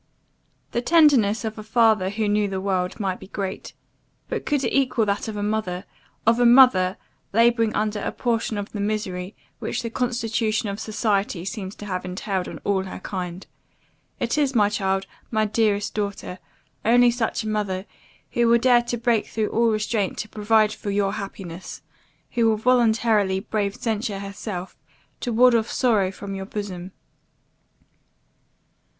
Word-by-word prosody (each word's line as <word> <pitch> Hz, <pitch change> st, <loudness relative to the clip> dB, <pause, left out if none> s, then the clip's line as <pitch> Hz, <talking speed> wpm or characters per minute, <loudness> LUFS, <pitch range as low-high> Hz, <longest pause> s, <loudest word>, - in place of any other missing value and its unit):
"The 240 Hz, -, 0 dB
tenderness 255 Hz, -8 st, +4 dB
of 220 Hz, 0 st, -4 dB
a -, -, -6 dB
father 220 Hz, -3 st, +3 dB
who 215 Hz, +1 st, -1 dB
knew 205 Hz, 0 st, +2 dB
the 190 Hz, -1 st, -3 dB
world, 190 Hz, 0 st, -1 dB
might 190 Hz, -3 st, -2 dB
be -, -, -11 dB
great; 195 Hz, -1 st, -5 dB, 0.6 s
but -, -, -4 dB
could 290 Hz, -2 st, +1 dB
it -, -, -1 dB
equal 255 Hz, -4 st, +2 dB
that 200 Hz, +1 st, -1 dB
of 215 Hz, -1 st, -5 dB
a 205 Hz, -, -2 dB
mother 205 Hz, -3 st, -2 dB, 0.4 s
of 230 Hz, +2 st, +4 dB
a 245 Hz, -, +4 dB
mother, 235 Hz, -7 st, +6 dB, 0.4 s
labouring 230 Hz, 0 st, +3 dB
under 215 Hz, 0 st, 0 dB
a -, -, -2 dB
portion 230 Hz, -3 st, -1 dB
of 205 Hz, 0 st, -5 dB
the 210 Hz, -, -5 dB
misery, 200 Hz, -2 st, -3 dB, 0.2 s
which -, -, -3 dB
the 230 Hz, -, -4 dB
constitution 225 Hz, -3 st, -1 dB
of 200 Hz, +1 st, -4 dB
society 210 Hz, -4 st, -1 dB
seems 195 Hz, -1 st, -5 dB
to 210 Hz, -, -9 dB
have 185 Hz, -3 st, -3 dB
entailed 185 Hz, 0 st, -3 dB
on -, -, -7 dB
all 190 Hz, -2 st, 0 dB
her 190 Hz, -, -7 dB
kind? 180 Hz, -1 st, -5 dB, 0.7 s
It -, -, 0 dB
is, 275 Hz, -3 st, +1 dB
my 205 Hz, -3 st, +4 dB
child, 195 Hz, -2 st, -1 dB, 0.2 s
my 215 Hz, -1 st, +1 dB
dearest 210 Hz, -1 st, +1 dB
daughter, 200 Hz, -3 st, -4 dB, 0.4 s
only 240 Hz, +2 st, +5 dB
such 230 Hz, -2 st, -1 dB
a -, -, -5 dB
mother, 200 Hz, -3 st, -2 dB, 0.5 s
who 235 Hz, -1 st, +2 dB
will 235 Hz, 0 st, +6 dB
dare 245 Hz, 0 st, +5 dB
to 240 Hz, 0 st, -3 dB
break 235 Hz, -2 st, +1 dB
through 220 Hz, -1 st, -2 dB
all 230 Hz, 0 st, +2 dB
restraint 215 Hz, -2 st, -1 dB
to 215 Hz, -, -4 dB
provide 215 Hz, 0 st, +2 dB
for 205 Hz, -, -6 dB
your 200 Hz, 0 st, +1 dB
happiness 190 Hz, -4 st, -7 dB, 0.5 s
who 230 Hz, -2 st, +3 dB
will 220 Hz, -, +2 dB
voluntarily 220 Hz, -4 st, +3 dB
brave 200 Hz, 0 st, -2 dB
censure 220 Hz, -4 st, -2 dB
herself, 195 Hz, -1 st, -6 dB, 0.4 s
to 245 Hz, -, -3 dB
ward 245 Hz, +2 st, +5 dB
off 230 Hz, -1 st, +2 dB
sorrow 215 Hz, -7 st, +2 dB
from 195 Hz, +1 st, -7 dB
your 195 Hz, 0 st, -5 dB
bosom. 195 Hz, -3 st, -5 dB
215 Hz, 165 wpm, -23 LUFS, 195-230 Hz, 0.7 s, mother